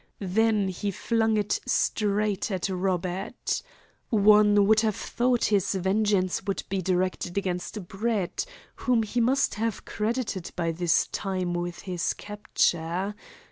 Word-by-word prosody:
Then 210 Hz, +1 st, +2 dB
he 195 Hz, +3 st, -3 dB
flung 225 Hz, +2 st, +1 dB
it 210 Hz, -1 st, 0 dB
straight 210 Hz, -1 st, +1 dB
at 190 Hz, -2 st, -2 dB
Robert. 185 Hz, +2 st, -2 dB, 0.5 s
One 210 Hz, -1 st, +5 dB
would 215 Hz, +1 st, +5 dB
have 215 Hz, -2 st, +1 dB
thought 245 Hz, 0 st, 0 dB
his 195 Hz, -1 st, +2 dB
vengeance 190 Hz, 0 st, +1 dB
would 195 Hz, -, -1 dB
be 195 Hz, -1 st, -1 dB
directed 185 Hz, 0 st, -1 dB
against 185 Hz, 0 st, -3 dB
Brett, 205 Hz, -2 st, -1 dB, 0.3 s
whom 245 Hz, -3 st, +2 dB
he 235 Hz, +3 st, -1 dB
must 265 Hz, +4 st, +2 dB
have 225 Hz, -3 st, -2 dB
credited 215 Hz, -4 st, -2 dB
by 170 Hz, -2 st, 0 dB
this 165 Hz, -2 st, +2 dB
time 185 Hz, -3 st, -2 dB
with 175 Hz, 0 st, -3 dB
his 180 Hz, -3 st, -2 dB
capture. 190 Hz, -2 st, -1 dB
200 Hz, 130 wpm, -27 LUFS, 185-215 Hz, 0.5 s, One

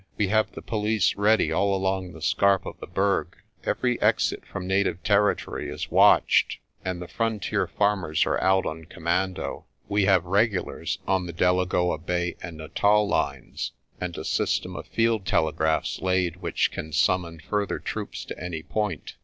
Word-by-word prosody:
We 100 Hz, -3 st, +1 dB
have 110 Hz, +1 st, +2 dB
the -, -, -9 dB
police 105 Hz, -2 st, +1 dB
ready 110 Hz, +2 st, +3 dB
all 100 Hz, -1 st, +2 dB
along 95 Hz, -1 st, -1 dB
the -, -, -10 dB
scarp 100 Hz, -2 st, +3 dB
of -, -, -7 dB
the -, -, -8 dB
Berg. 95 Hz, +3 st, 0 dB, 0.3 s
Every 125 Hz, -1 st, 0 dB
exit -, -, +2 dB
from 95 Hz, -1 st, -6 dB
native 95 Hz, -2 st, 0 dB
territory 105 Hz, 0 st, +1 dB
is -, -, -5 dB
watched, -, -, +5 dB, 0.3 s
and 95 Hz, -2 st, -3 dB
the 90 Hz, -, -7 dB
frontier 115 Hz, -2 st, -1 dB
farmers 100 Hz, -7 st, +1 dB
are -, -, 0 dB
out 95 Hz, 0 st, +3 dB
on 80 Hz, +1 st, -5 dB
commando. 90 Hz, +3 st, -2 dB, 0.2 s
We 100 Hz, -1 st, +2 dB
have 95 Hz, -3 st, +4 dB
regulars 100 Hz, +1 st, 0 dB
on 95 Hz, -2 st, +1 dB
the 85 Hz, -, -6 dB
Delagoa 90 Hz, -1 st, +1 dB
Bay 90 Hz, +1 st, -2 dB
and 85 Hz, -1 st, -7 dB
Natal 105 Hz, +7 st, +2 dB
lines, -, -, -2 dB, 0.3 s
and 90 Hz, -1 st, -4 dB
a 80 Hz, -, -5 dB
system -, -, 0 dB
of -, -, -7 dB
field 115 Hz, -2 st, +1 dB
telegraphs 80 Hz, 0 st, +1 dB
laid 90 Hz, -2 st, +1 dB
which 90 Hz, -, 0 dB
can 80 Hz, -, -6 dB
summon 85 Hz, +1 st, +1 dB
further 100 Hz, +5 st, -2 dB
troops -, -, -5 dB
to -, -, -7 dB
any 85 Hz, -3 st, -4 dB
point. 105 Hz, +3 st, -3 dB
95 Hz, 160 wpm, -26 LUFS, 85-100 Hz, 0.3 s, watched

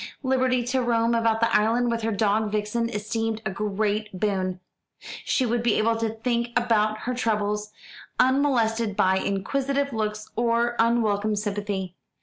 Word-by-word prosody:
Liberty 260 Hz, -1 st, +2 dB
to 255 Hz, +2 st, 0 dB
roam 235 Hz, -1 st, +1 dB
about 230 Hz, -1 st, +1 dB
the 230 Hz, 0 st, +2 dB
island 235 Hz, +3 st, +2 dB
with 230 Hz, 0 st, -1 dB
her 225 Hz, +1 st, -1 dB
dog 210 Hz, +1 st, +1 dB
Vixen 215 Hz, +2 st, -1 dB
esteemed 225 Hz, +1 st, -2 dB
a 195 Hz, -, -1 dB
great 210 Hz, 0 st, -2 dB
boon. 185 Hz, -2 st, -1 dB, 0.6 s
She 260 Hz, -, +1 dB
would 240 Hz, 0 st, 0 dB
be 235 Hz, -3 st, +2 dB
able 225 Hz, +1 st, +2 dB
to 225 Hz, 0 st, -1 dB
think 235 Hz, +2 st, -1 dB
about 215 Hz, -3 st, +1 dB
her 250 Hz, -, -2 dB
troubles, 210 Hz, -3 st, -1 dB, 0.5 s
unmolested 235 Hz, -5 st, +2 dB
by 190 Hz, -2 st, +3 dB
inquisitive 275 Hz, +9 st, -1 dB
looks 215 Hz, -1 st, -3 dB
or 235 Hz, +1 st, +1 dB
unwelcome 215 Hz, -2 st, +2 dB
sympathy. 205 Hz, -3 st, -3 dB
225 Hz, 145 wpm, -25 LUFS, 210-235 Hz, 0.6 s, by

